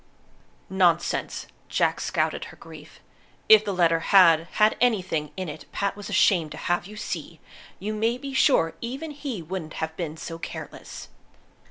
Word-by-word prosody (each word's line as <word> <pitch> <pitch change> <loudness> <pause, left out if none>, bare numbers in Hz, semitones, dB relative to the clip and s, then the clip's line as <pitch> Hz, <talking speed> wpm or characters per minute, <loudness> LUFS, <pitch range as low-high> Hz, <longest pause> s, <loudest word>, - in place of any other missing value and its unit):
"Nonsense!" 175 -3 +1 0.2
Jack - - +1
scouted - - -1
her - - -13
grief. - - -13 0.5
"If 215 -1 +8
the 205 - -2
letter 170 -3 +3
had 165 -3 +5
had 215 0 +4
anything 185 -11 +1
in 185 -1 -3
it 150 - -8
Pat 200 0 -1
was 205 0 -8
ashamed 170 -6 +3
to - - -9
have 175 +1 -1
you 210 - -11
see, - - -5 0.4
you 210 +2 -4
may 225 +3 0
be 275 +1 -7
sure 255 - +3
even 270 +7 -5
he 275 - -5
wouldn't 160 -1 -6
have 160 0 -4
been 160 -3 -4
so 165 +1 -7
careless." - - -8
190 Hz, 160 wpm, -25 LUFS, 165-215 Hz, 0.5 s, If